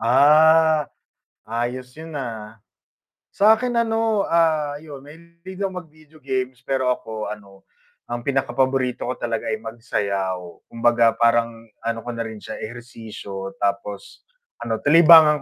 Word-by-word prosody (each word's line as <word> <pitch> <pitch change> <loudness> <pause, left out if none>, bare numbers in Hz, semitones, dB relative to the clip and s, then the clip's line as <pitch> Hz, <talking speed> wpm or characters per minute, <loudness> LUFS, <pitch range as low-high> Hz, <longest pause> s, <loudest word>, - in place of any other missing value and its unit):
Ah, 155 +5 +5 0.6
ayos 125 +2 -4
yun, 160 +1 -10
ah. 110 -4 -7 0.8
Sa 215 +2 +5
akin 250 +1 -2
ano, 225 -2 +1
ah, 155 -3 +2
yun 145 -3 -11
mahilig 170 +5 -13
ako 190 - -4
mag-video 155 -1 -21
games 130 -2 -3
pero 130 -1 0
ako 110 -3 -7
ano 100 -2 -10 0.4
ang 120 0 -5
pinakapaborito 130 -1 0
ko 130 - -3
talaga 115 -1 -3
ay 110 - -1
magsayaw. 100 -6 -4
Kumbaga 115 -1 +2
parang 115 0 +3 0.3
ano 115 0 -2
ko 120 - -5
na 115 - -4
rin 110 -1 -6
siya - - -8
ehersisyo 110 -4 -8
tapos 100 0 -4 0.4
ano 115 -1 -2
libangan 155 -1 +7
125 Hz, 130 wpm, -22 LUFS, 115-155 Hz, 0.8 s, libangan